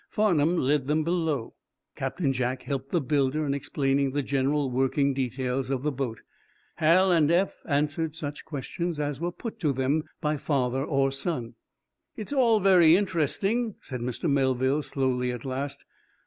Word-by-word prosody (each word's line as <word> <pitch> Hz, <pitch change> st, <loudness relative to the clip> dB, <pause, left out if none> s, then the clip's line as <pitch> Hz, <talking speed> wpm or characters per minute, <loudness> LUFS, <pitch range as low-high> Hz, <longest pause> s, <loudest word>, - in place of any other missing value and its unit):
Farnum 175 Hz, -6 st, +2 dB
led 140 Hz, -2 st, +1 dB
them 155 Hz, +2 st, +1 dB
below. 160 Hz, -7 st, -1 dB, 0.4 s
Captain 135 Hz, +2 st, -1 dB
Jack 125 Hz, 0 st, -2 dB
helped 135 Hz, -1 st, -4 dB
the 175 Hz, -, +1 dB
builder 145 Hz, +1 st, 0 dB
in 140 Hz, -, 0 dB
explaining 140 Hz, -1 st, 0 dB
the 145 Hz, 0 st, 0 dB
general 140 Hz, +1 st, 0 dB
working 135 Hz, +2 st, +1 dB
details 130 Hz, 0 st, -2 dB
of 135 Hz, -1 st, -1 dB
the 150 Hz, -, +1 dB
boat. 130 Hz, -4 st, -4 dB, 0.6 s
Hal 180 Hz, +4 st, +4 dB
and 160 Hz, -4 st, +4 dB
Eph 180 Hz, +4 st, +1 dB
answered 150 Hz, +2 st, 0 dB
such 150 Hz, -2 st, -6 dB
questions 160 Hz, +3 st, -4 dB
as 145 Hz, -2 st, -2 dB
were 175 Hz, +1 st, -2 dB
put 230 Hz, +4 st, -7 dB
to 155 Hz, -7 st, +1 dB
them 135 Hz, +4 st, 0 dB
by 150 Hz, -2 st, 0 dB
father 135 Hz, -2 st, 0 dB
or 135 Hz, -2 st, +1 dB
son. 135 Hz, -4 st, -3 dB, 0.6 s
"It's 215 Hz, +6 st, -5 dB
all 235 Hz, -5 st, +4 dB
very 180 Hz, -4 st, +6 dB
interesting," 200 Hz, -, 0 dB
said 125 Hz, -3 st, -7 dB
Mr. 125 Hz, +7 st, -3 dB
Melville, 135 Hz, 0 st, +2 dB
slowly, 130 Hz, -3 st, -1 dB
at 125 Hz, 0 st, -7 dB
last. 140 Hz, +2 st, -4 dB
145 Hz, 160 wpm, -27 LUFS, 135-165 Hz, 0.6 s, very